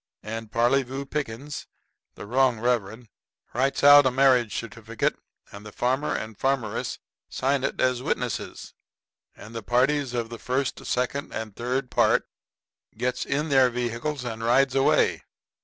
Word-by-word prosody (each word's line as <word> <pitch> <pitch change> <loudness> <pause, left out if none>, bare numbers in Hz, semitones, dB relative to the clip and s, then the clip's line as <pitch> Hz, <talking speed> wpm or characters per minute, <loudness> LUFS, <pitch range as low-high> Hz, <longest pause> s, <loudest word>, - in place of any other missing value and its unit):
And 115 0 -6
Parleyvoo 130 +3 +1
Pickens, 140 0 -5 0.5
the - - -9
wrong 125 +1 +2
reverend, 115 -1 -1 0.5
writes 135 +4 0
out 145 -1 +9
a - - +4
marriage 125 -3 +3
certificate, 115 0 -3 0.4
and 105 +1 -10
farmer 130 +4 0
and 110 0 -5
farmeress 130 -3 -1 0.3
sign 135 0 0
it 140 - -2
as 125 -1 +1
witnesses. 125 -6 -3 0.6
And 110 - -12
the 115 - -5
parties 125 +4 +1
of 115 -1 -2
the 115 -1 -8
first, 130 +1 -2
second 125 +4 -1
and 110 -3 -5
third 125 +2 -2
part - - +3 0.7
gets 125 +2 -1
in 150 +3 -1
their 130 -2 +5
vehicles 125 +4 -3
and 115 -1 -5
rides 130 +3 +3
away. 135 0 +3
125 Hz, 140 wpm, -25 LUFS, 115-135 Hz, 0.7 s, out